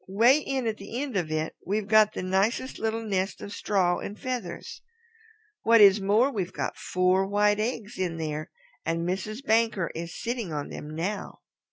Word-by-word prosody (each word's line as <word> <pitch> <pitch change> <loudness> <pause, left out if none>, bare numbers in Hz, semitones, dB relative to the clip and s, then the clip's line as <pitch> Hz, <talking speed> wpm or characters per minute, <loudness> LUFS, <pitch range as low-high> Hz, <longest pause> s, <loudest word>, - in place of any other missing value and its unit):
'Way 230 +9 +5
in 270 -4 -2
at 220 -1 -1
the 210 +5 -6
end 275 -4 -3
of 175 -5 0
it 155 0 -2
we've 205 +2 -1
got 215 0 +5
the - - -4
nicest 200 +8 0
little 225 +1 -1
nest 195 -2 -1
of 205 - -7
straw 185 -5 +1
and 205 - -7
feathers. 255 -2 -5 0.8
What 230 0 +5
is 200 -1 +7
more, 215 +8 +3
we've 190 -7 -3
got - - -3
four 185 +1 +1
white 205 +1 +2
eggs 225 0 -3
in 175 -3 -1
there, 155 -1 -4 0.3
and 165 +1 -1
Mrs. 215 +8 -3
Banker 225 -7 +2
is 165 0 -6
sitting 235 -5 -3
on 150 -2 -4
them 150 - -7
now." 190 +6 -4
205 Hz, 180 wpm, -27 LUFS, 185-225 Hz, 0.8 s, is